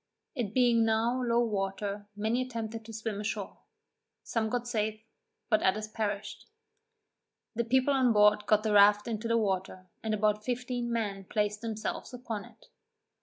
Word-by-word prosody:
It 230 - -3
being 240 -2 +4
now 225 +3 +1
low 240 -1 +2
water, 200 -1 -3
many 220 +4 0
attempted 230 -3 -5
to 225 - -9
swim 220 -2 -4
ashore; 210 -2 -4 0.6
some 220 -2 -1
got 245 +1 -2
safe, 215 -2 -1 0.5
but 215 -2 +3
others 210 +3 +1
perished. 210 -1 -4 1.1
The 235 0 0
people 260 +4 +3
on 260 -3 +4
board 210 -1 +4
got 215 0 +4
the 215 -2 +1
raft 205 +1 +6
into 225 0 -3
the 230 0 +2
water, 185 -3 -2
and 220 -1 -1
about 210 0 +1
fifteen 245 0 -2
men 205 -4 -2
placed 210 +1 -1
themselves 225 +2 -4
upon 230 -4 -5
it. - - -19
220 Hz, 155 wpm, -30 LUFS, 210-235 Hz, 1.1 s, raft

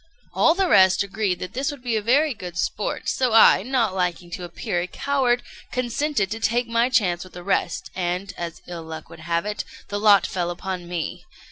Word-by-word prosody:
All 325 - +4
the 385 0 +2
rest 190 - +5
agreed 200 -2 -1
that 180 +3 -6
this 270 +4 -1
would 285 -4 -8
be 240 -2 0
very 270 +7 +3
good 180 -6 -8
sport; - - -2
so 250 -3 +1
I, 225 -4 +7
not 235 -3 0
liking 180 -2 -2
to 180 - -5
appear 175 0 -3
a 180 - -3
coward, 255 0 0 0.3
consented 250 -3 -1
to 225 - -3
take 240 +2 +1
my 230 +2 +2
chance 180 -9 +2
with 185 - -15
the 175 - -9
rest; 195 - -1
and, 180 +2 -2
as 170 -1 -6
ill 175 -1 -6
luck 160 -1 -9
would - - -11
have 170 +2 -1
it, 210 0 -3 0.3
the 205 - -2
lot 205 -2 +6
fell 175 -2 -2
upon 180 0 -5
me. 175 -3 -4
200 Hz, 205 wpm, -23 LUFS, 175-240 Hz, 0.3 s, I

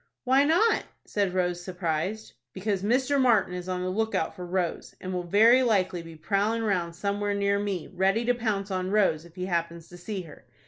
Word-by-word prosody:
"Why 270 +2 +4
not?" 350 +9 +3 0.2
said 200 -3 -1
Rose, 180 -1 0
surprised. 180 +3 -3 0.2
"Because 195 0 -2
Mr. 260 +6 +2
Martin 220 -8 +3
is 180 0 -5
on 180 0 -2
the 185 - -1
lookout 220 -4 -1
for 180 -1 -7
Rose, 180 -1 -2
and 185 0 -5
will 180 - -1
very 225 +7 +6
likely 190 -7 +1
be 165 -1 -11
prowling 205 +7 0
round 175 -5 -1
somewhere 205 +2 -1
near 200 0 +1
me, 195 -5 -3
ready 195 +5 +1
to 245 - +3
pounce 210 -4 -2
on 185 0 -1
Rose 190 -6 +2
if 170 0 -17
he 180 -1 -4
happens 170 -2 -3
to 175 - -11
see 190 +1 -5
her. 155 -3 -14
195 Hz, 195 wpm, -27 LUFS, 180-215 Hz, 0.2 s, very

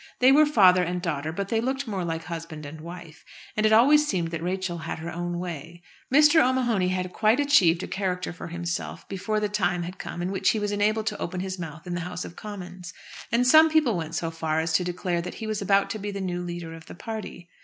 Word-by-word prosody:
They 255 +1 +6
were 300 +2 +6
father 185 -10 +6
and 180 0 -1
daughter, 160 -3 -2
but 195 +4 -4
they 225 -1 +1
looked 265 +3 -2
more 200 -5 -3
like 165 -1 -3
husband 160 -3 -7
and 155 +2 -9
wife, 170 -2 -10 0.3
and 215 0 +3
it - - +1
always 290 +7 +6
seemed 175 - -1
that 165 -1 -4
Rachel 180 0 -2
had 160 - -5
her 165 +2 -6
own 175 +1 -3
way. 175 -1 -7 0.3
Mr. 300 +3 +6
O'Mahony 245 -7 +1
had 185 0 -2
quite 220 +4 +3
achieved 190 - +4
a - - -4
character 185 -2 -2
for 175 - -8
himself 170 +1 -4
before 215 +2 -2
the 210 - 0
time 195 -4 0
had 180 +2 -7
come 175 - -5
in 180 - -2
which 190 -1 +2
he 215 - +1
was 205 0 -1
enabled 210 +1 +1
to - - -3
open 180 +1 -3
his 190 0 -4
mouth 160 0 -7
in 175 - -4
the 175 - -2
House 180 +1 -5
of 170 - -10
Commons. 180 -4 -8 0.4
And 240 +1 +3
some 315 +5 +7
people 305 -8 +3
went 160 -2 -4
so 165 -1 -2
far 160 -1 -1
as 160 0 -1
to 180 - +3
declare 175 -1 -2
that 180 +1 -7
he 220 - -6
was 215 -1 -2
about 195 0 +2
to 220 - -4
be 205 +1 -4
the 200 -1 -5
new 180 -2 -3
leader 175 -2 -6
of 165 0 -12
the - - -10
party. 215 -4 -7
180 Hz, 245 wpm, -26 LUFS, 170-215 Hz, 0.4 s, some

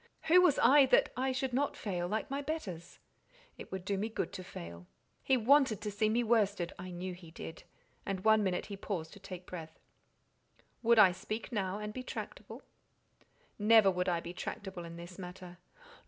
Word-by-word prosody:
Who 355 +3 +6
was 355 -6 +4
I 270 +3 +6
that - - +4
I 260 +1 0
should 260 0 -2
not 280 +3 0
fail, 180 -4 -2
like 220 +8 -3
my 280 +1 -1
betters? 240 - -5 0.6
It - - -10
would 190 -1 -5
do 200 -1 -1
me 215 +3 -1
good 220 - -3
to 185 -2 -6
fail. 85 - -9 0.3
He 265 - +3
wanted 255 -2 +4
to 210 0 -3
see 215 +2 +1
me 235 +2 +2
worsted 205 -6 +1
(I 180 +1 -6
knew 180 +1 -5
he 175 -2 -12
did), 160 0 -9 0.4
and 195 -1 -4
one 220 -1 +5
minute 185 -2 -1
he 200 - -6
paused 170 -6 -4
to - - -12
take 185 -2 -9
breath. 160 -3 -8 1.0
"Would 235 0 +4
I 200 -4 +8
speak 215 +7 -5
now, 195 -3 -1
and 210 0 -5
be 255 - -5
tractable?" - - -7 1.0
"Never 210 -1 +6
would 180 0 -1
I 170 -1 0
be 170 +1 -7
tractable 185 -1 -6
in 170 0 -9
this 175 +2 -10
matter. 180 -1 -9
200 Hz, 190 wpm, -33 LUFS, 180-230 Hz, 1.0 s, I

